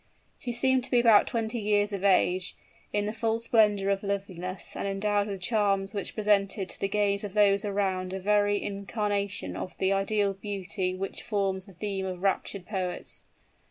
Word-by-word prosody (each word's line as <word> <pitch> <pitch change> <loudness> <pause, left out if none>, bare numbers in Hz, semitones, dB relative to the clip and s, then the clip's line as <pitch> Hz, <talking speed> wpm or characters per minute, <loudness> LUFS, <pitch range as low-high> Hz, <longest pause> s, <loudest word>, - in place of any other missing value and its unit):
She 245 - -4
seemed 260 +2 +3
to - - -12
be 245 - +4
about 230 -3 +6
twenty 230 -1 -2
years 205 -1 +1
of 195 -1 -3
age, 185 -1 +3 0.4
in 205 0 0
the 210 - -2
full 225 0 0
splendor 210 -4 +3
of 195 0 0
loveliness, 190 -2 -4
and - - -2
endowed 205 +1 0
with 195 -2 -5
charms 200 -1 +1
which 200 - -3
presented 200 -2 +1
to - - -5
the 195 - 0
gaze 200 0 +1
of 205 -1 -6
those 200 -1 +4
around 190 -2 -1
a 190 - -3
very 205 +1 +2
incarnation 200 0 -2
of 185 - -6
the 190 +1 +2
ideal 200 0 +1
beauty 195 -1 -3
which 195 +1 -5
forms 195 -3 -1
the 195 - -13
theme 195 +1 -3
of 180 0 -6
raptured 195 -1 -1
poets. 185 -3 -4
200 Hz, 180 wpm, -28 LUFS, 195-210 Hz, 0.4 s, about